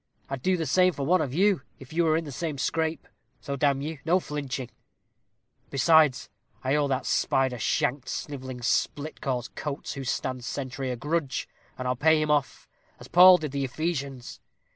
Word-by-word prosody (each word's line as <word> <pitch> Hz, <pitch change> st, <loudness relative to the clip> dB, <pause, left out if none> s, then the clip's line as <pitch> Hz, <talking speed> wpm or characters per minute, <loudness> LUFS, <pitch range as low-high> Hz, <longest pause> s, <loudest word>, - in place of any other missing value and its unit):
I'd 135 Hz, -2 st, -3 dB
do 185 Hz, +6 st, +2 dB
the 165 Hz, -, -2 dB
same 180 Hz, +6 st, +3 dB
for 140 Hz, -, -3 dB
one 180 Hz, +4 st, +3 dB
of 140 Hz, -5 st, -2 dB
you 190 Hz, +2 st, +2 dB, 0.2 s
if 135 Hz, +2 st, -13 dB
you 170 Hz, +1 st, +2 dB
were 155 Hz, 0 st, +3 dB
in 165 Hz, -, -2 dB
the 145 Hz, -, -7 dB
same 155 Hz, +1 st, -4 dB
scrape, 160 Hz, +3 st, -1 dB, 0.3 s
so, 140 Hz, -, -4 dB
damn 140 Hz, 0 st, +1 dB
you, 155 Hz, -1 st, -5 dB
no 180 Hz, +3 st, +3 dB
flinching; 140 Hz, -6 st, -5 dB, 1.0 s
besides, 150 Hz, 0 st, +4 dB, 0.4 s
I 130 Hz, +1 st, +1 dB
owe 145 Hz, -1 st, +2 dB
that 130 Hz, -1 st, -1 dB
spider 130 Hz, -2 st, +1 dB
shanked, 130 Hz, +4 st, 0 dB
snivelling 130 Hz, -4 st, -6 dB
split 145 Hz, +5 st, -1 dB
cause 125 Hz, -4 st, -2 dB
Coates, 145 Hz, -1 st, -5 dB
who 140 Hz, -, -6 dB
stands 125 Hz, 0 st, -3 dB
sentry, 130 Hz, -1 st, -4 dB
a 125 Hz, -, -2 dB
grudge, 150 Hz, +2 st, -2 dB, 0.3 s
and 130 Hz, -, -4 dB
I'll 125 Hz, -, +1 dB
pay 160 Hz, +4 st, +4 dB
him 155 Hz, -1 st, 0 dB
off, 145 Hz, -4 st, 0 dB, 0.3 s
as -, -, -11 dB
Paul 180 Hz, +1 st, +9 dB
did 150 Hz, -5 st, -5 dB
the 140 Hz, 0 st, -2 dB
Ephesians. 140 Hz, -3 st, -4 dB
140 Hz, 185 wpm, -27 LUFS, 130-160 Hz, 1.0 s, Paul